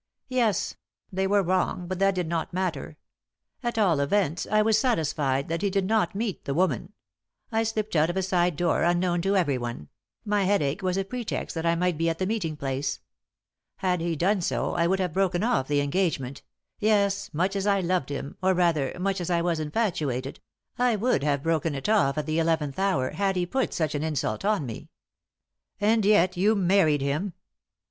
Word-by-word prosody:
"Yes; 235 -7 +1 0.4
they 190 +1 0
were 200 0 +3
wrong, 180 0 0
but 185 0 -4
that 195 0 +3
did 180 -2 -1
not 165 0 -2
matter. 170 -5 -3 0.6
At 240 -2 -3
all 185 -9 +3
events, 160 +2 0
I 215 0 +4
was 220 0 +3
satisfied 150 - 0
that 165 +1 -2
he 200 - +1
did 195 0 0
not 210 -3 +1
meet 210 -2 -3
the 140 - -2
woman. 185 +2 0 0.6
I 225 0 +1
slipped 215 -3 -2
out 155 +1 +3
of 175 - -2
a 190 - +1
side 180 -2 +1
door 175 +2 +1
unknown 175 0 +2
to 195 +3 +1
everyone; 120 - -2 0.4
my 205 -2 +1
headache 155 -8 +1
was 185 0 0
a 195 - 0
pretext 240 +2 -4
that 165 0 -2
I 170 - +3
might 175 -2 0
be 165 0 +2
at 165 - -2
the 185 - -1
meeting 185 -7 -2
place. 135 0 -2 0.8
Had 180 -2 0
he 170 0 -1
done 190 +5 +1
so, - - -1
I 170 -1 +2
would 190 +2 +1
have 180 -4 -1
broken 190 -1 +1
off 230 - +1
the 145 -1 +2
engagement 140 -4 -1 0.4
yes, 200 -2 +2
much 185 +5 0
as 195 +1 -1
I 200 -1 +3
loved 180 -6 0
him, 140 0 -5
or 190 0 +3
rather, 165 -6 +1
much 195 0 -1
as 175 - -3
I 170 -1 +1
was 170 -2 0
infatuated 150 - -2 0.4
I 245 -2 +3
would 220 - +1
have 140 -1 0
broken 165 -2 0
it 135 - -4
off 200 -10 +3
at 150 - -1
the 155 +1 0
eleventh 160 -3 0
hour 170 -10 +1
had 195 -1 0
he 180 -1 0
put 265 +8 -1
such 155 -3 -1
an 145 - -2
insult 150 - -2
on 205 -7 +1
me!" 115 -3 -8 0.9
"And 220 +1 +3
yet 195 -3 +4
you 210 +4 +3
married 180 -6 +3
him?" 150 +8 -1
180 Hz, 200 wpm, -26 LUFS, 155-200 Hz, 0.9 s, I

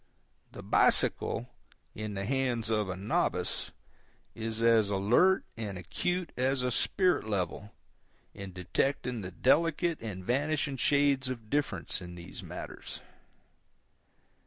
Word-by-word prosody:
The - - -9
bicycle, 120 - +3 0.5
in 105 -1 -5
the 100 0 -3
hands 120 -3 0
of 105 -3 +1
a 90 - -2
novice, 95 +2 -1 0.6
is 110 0 -4
as 115 -3 +5
alert 110 - +3
and 105 -4 -5
acute 175 - -2
as 130 +1 +1
a 125 - 0
spirit 180 - +2
level 100 +1 -3 0.6
in 95 -1 -8
the 90 0 -7
detecting 125 +3 -1
of 90 -1 -9
delicate 165 +4 +3
and 95 -5 -6
vanishing 140 +2 0
shades 140 -1 +2
of 115 -4 -6
difference 145 -8 0
in 90 -1 -8
these 85 0 -9
matters. - - -7
115 Hz, 125 wpm, -30 LUFS, 100-140 Hz, 0.6 s, as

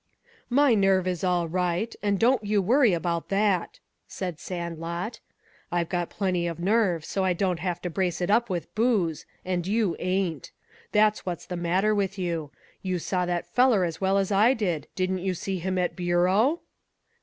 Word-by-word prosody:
"My 275 0 +4
nerve 195 -3 +3
is 180 -2 -2
all 180 -2 +1
right, 180 +5 -1
and 205 -1 +1
don't 240 -1 +3
you 205 0 +1
worry 235 +4 +4
about 170 -1 -2
that," 195 -3 0 0.3
said 180 -5 -5
Sandlot. 170 +3 -5 0.5
"I've 170 -1 0
got 175 -2 -1
plenty 185 -4 -1
of 170 0 -5
nerve 185 -4 +1
so 195 - -2
I 185 -1 +2
don't 180 -1 -1
have 175 0 -2
to 180 - -2
brace 180 0 -1
it 180 +2 0
up 235 +2 +3
with 175 -3 -4
booze, 210 -9 0 0.2
and 180 -1 -2
you 210 -3 +1
ain't. 185 -4 -2 0.4
That's 215 0 +3
what's 175 -3 -5
the 180 - -5
matter 180 +5 +1
with 200 -1 -1
you. 170 -5 -2 0.3
You 185 -1 -1
saw 180 +1 -1
that 175 -1 -1
feller 245 -7 +4
as 165 0 -5
well 195 +1 +2
as 195 0 0
I 215 +6 +4
did. 180 -8 -2
Didn't 185 0 0
you 185 0 -2
see 190 +2 -3
him 185 +2 -2
at 180 -1 0
Bureau?" 185 - +2
185 Hz, 180 wpm, -26 LUFS, 175-205 Hz, 0.5 s, My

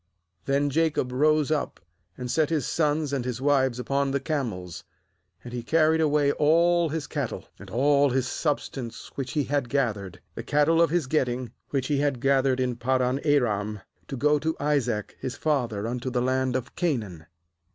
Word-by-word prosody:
17Then 140 +1 +2
Jacob 150 -3 +1
rose 155 +3 +2
up, 150 -2 -1 0.4
and 125 -1 -4
set 155 +3 +2
his 155 -6 0
sons 150 -2 0
and 135 -3 -1
his 125 -1 -3
wives 130 -3 +2
upon 140 +2 0
the 140 +1 0
camels; 115 - -4 0.6
^and 120 - -7
he 120 - -3
carried 160 +5 +3
away 150 -2 +3
all 170 +3 +3
his 155 0 -3
cattle, - - -4
and - - -11
all 140 +3 +3
his 130 0 0
substance 135 -6 -3
which 135 -2 -5
he 150 - +1
had 140 -2 -1
gathered, 105 -9 -1
the - - -6
cattle 150 +6 +3
of 170 - +4
his 170 -2 +1
getting, 125 -3 -1 0.2
which 135 -2 -1
he 145 0 0
had 140 -3 0
gathered 135 0 +2
in 125 -2 -1
Paddan 130 +1 +1
aram, 110 -8 +1 0.3
to 135 - -5
go 150 +3 +3
to 160 +2 -1
Isaac 130 -8 -1
his 130 -1 -4
father 120 -10 -1
unto 125 +2 -3
the 125 -1 -1
land 130 0 0
of 130 -2 -4
Canaan. 105 - -2
135 Hz, 175 wpm, -26 LUFS, 125-150 Hz, 0.6 s, of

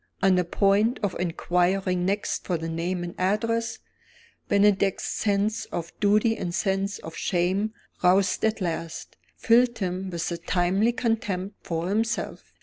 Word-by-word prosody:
On 195 -1 +5
the 180 0 +3
point 200 +6 +2
of 200 - 0
inquiring 180 +1 0
next 200 +1 -1
for 180 - 0
the 165 +1 -5
name 175 +2 -2
and 175 - -5
address, 230 +5 0 0.7
Bennydeck's 200 -1 +3
sense 215 +1 0
of 170 -1 -5
duty 210 +2 +3
and 175 -4 -4
sense 195 +1 0
of 160 - -9
shame 190 +5 0 0.3
(roused 185 +1 +3
at 220 -1 +1
last) 165 -2 -4 0.2
filled 235 +1 +4
him 185 -1 -3
with 170 -1 -3
a 170 - -2
timely 185 +6 +1
contempt 210 -5 -2
for 165 0 -3
himself. 225 +3 -2
195 Hz, 145 wpm, -26 LUFS, 175-210 Hz, 0.7 s, On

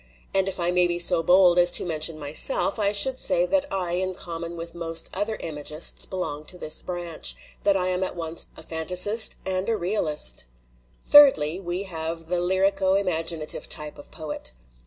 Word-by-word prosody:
And 195 0 0
if 190 -1 -4
I 175 0 -1
may 180 0 +2
be 175 0 -2
so 175 0 +4
bold 180 +1 +3
as 175 0 +6
to - - +4
mention 160 -1 +1
myself, 155 - +2
I 200 -1 +1
should 255 +6 +2
say 175 - +1
that 290 +7 -2
I 185 -3 -3
in 185 +1 -3
com 170 -2 -7
mon 170 0 -8
with 170 0 -8
most 165 -1 -1
other 205 +3 -3
imagists 150 0 +2
belong 165 -6 -5
to 180 - -5
this 155 -3 +1
branch, 175 -3 -1 0.3
that 200 -1 +1
I 185 -1 -1
am 185 0 -2
at 185 - -5
once 165 -1 -3
a - - -10
fantasist 180 +7 +3
and 190 +2 -1
a 225 - -1
realist. 155 - -1 0.6
"Thirdly, 185 - +4
we 180 0 -5
have 165 -2 -7
the 175 -1 -2
lyrico 190 +1 0
imaginative 165 -4 -2
type 150 -1 +1
of 145 - -14
poet. 150 - -6
175 Hz, 185 wpm, -23 LUFS, 165-190 Hz, 0.6 s, as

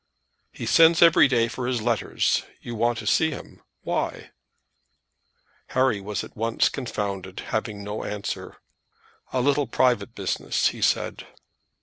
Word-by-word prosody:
"He - - -7
sends 165 0 +6
every 165 -3 +7
day 120 -3 +2
for 120 +1 -4
his 125 -2 0
letters. 120 -1 +1 0.2
You 120 - -7
want 115 +1 +1
to 110 - -6
see 160 +9 +3
him. 145 - -9 0.2
Why?" - - -3 1.4
Harry 130 -5 +1
was 100 0 -3
at - - -12
once 115 +1 +1
confounded, 100 -7 -4
having 110 -2 -2
no 105 +1 -5
answer. 105 -1 -5 0.7
"A 130 - 0
little 140 +1 +2
private 125 0 +1
business," 95 -2 0
he - - -9
said. - - 0
115 Hz, 135 wpm, -25 LUFS, 105-130 Hz, 1.4 s, every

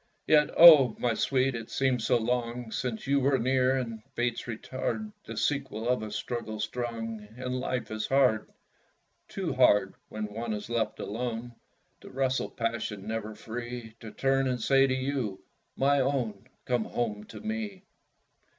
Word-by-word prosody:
Yet, 150 -1 +5
oh! 150 -9 +9
my 120 -2 +1
sweet, 130 +3 +1
it 115 -2 -6
seems 130 -4 0
so 125 - +4
long 120 0 -2
Since 120 -2 -3
you 140 +1 +3
were 135 0 +3
near; 130 +1 +2
and 115 -4 -4
fates 120 -1 -1
retard 130 - -4
The - - -7
sequel 135 -6 -1
of 125 -2 +2
a 110 - -5
struggle 110 -1 -4
strong, 115 -1 -4
And 125 0 -3
life 125 -2 -3
is 110 0 -2
hard 130 -5 +2 0.8
Too 185 -7 -3
hard, 105 -7 +4 0.2
when 110 0 -4
one 115 0 -3
is 105 +2 -6
left 115 -1 -1
alone 120 +2 -4 0.5
To - - -12
wrestle 130 0 0
passion, 115 -4 -3
never 110 -1 -4
free 120 +1 -6
To 110 - -8
turn 135 +3 +1
and 125 -1 -1
say 135 +3 +4
to 130 - 0
you, 130 -7 -2 0.3
"My 140 +1 +3
own, 125 -5 -1 0.2
Come 120 -3 0
home 105 -3 -3
to - - -10
me!" 215 -3 -4
120 Hz, 160 wpm, -29 LUFS, 110-135 Hz, 0.8 s, oh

